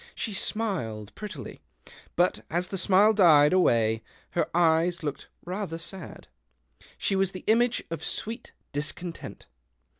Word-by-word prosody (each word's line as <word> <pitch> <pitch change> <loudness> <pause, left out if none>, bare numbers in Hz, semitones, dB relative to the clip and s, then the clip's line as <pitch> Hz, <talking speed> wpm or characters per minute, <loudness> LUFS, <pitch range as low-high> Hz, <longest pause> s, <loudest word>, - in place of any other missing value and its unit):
She 220 - -3
smiled 160 - -2
prettily; 205 - -8 0.5
but 175 +1 +2
as 175 +2 -1
the 195 - -3
smile 200 +3 +5
died 160 -6 +6
away 115 -11 +3 0.3
her - - 0
eyes 170 0 +2
looked 145 -2 -4 0.2
rather 180 -2 -3
sad. 185 +3 -8 0.7
She 195 - 0
was 190 0 +1
the 185 - -7
image 235 +2 +3
of 165 - -4
sweet 230 +2 -4 0.2
discontent. 165 +4 -5
180 Hz, 125 wpm, -27 LUFS, 155-200 Hz, 0.7 s, died